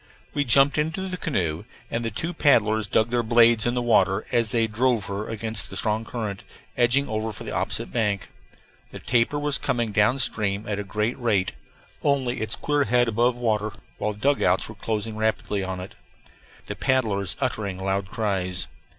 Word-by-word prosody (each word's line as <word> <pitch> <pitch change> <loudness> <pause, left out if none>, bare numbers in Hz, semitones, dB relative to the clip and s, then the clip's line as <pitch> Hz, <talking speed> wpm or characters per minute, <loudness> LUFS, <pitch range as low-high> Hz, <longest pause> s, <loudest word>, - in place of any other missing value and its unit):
We 145 - 0
jumped 135 +4 +4
into 160 +5 -1
the 185 - -3
canoe 90 - -2 0.3
and 115 - -1
the 115 - -1
two 160 - -3
paddlers 110 - +3
dug 110 +4 +1
their 120 -1 +2
blades 115 0 +5
in 120 - 0
the 125 - 0
water 110 -4 +3
as 115 -2 +2
they 115 0 +2
drove 115 0 +1
her 100 +2 -4
against 110 -1 -1
the - - -6
strong 110 -1 -1
current, 105 -5 -4 0.3
edging 125 +4 +3
over 110 +1 -2
for 100 - -9
the - - -6
opposite - - -2
bank. 105 -5 0 0.6
The - - -9
tapir 120 +4 +1
was 145 -1 0
coming 120 -2 -1
down 105 +5 +3
stream 105 -5 +1
at 105 -1 -2
a - - -2
great 105 +5 -2
rate, 105 -6 +1 0.5
only 130 -4 0
its 110 0 +1
queer 145 -1 0
head 120 +2 +3
above 120 +2 +2
water, 110 -3 -1 0.3
while 105 0 -1
the 105 - -15
dugouts 120 -8 +2
were 110 - -9
closing 110 +1 -3
rapidly 110 -2 -1
on 95 -1 -4
it, 90 +1 -8 0.7
the - - -5
paddlers 110 -7 0
uttering 105 -8 -2
loud 95 +1 -1
cries. 95 -4 -1
110 Hz, 185 wpm, -24 LUFS, 105-120 Hz, 0.7 s, blades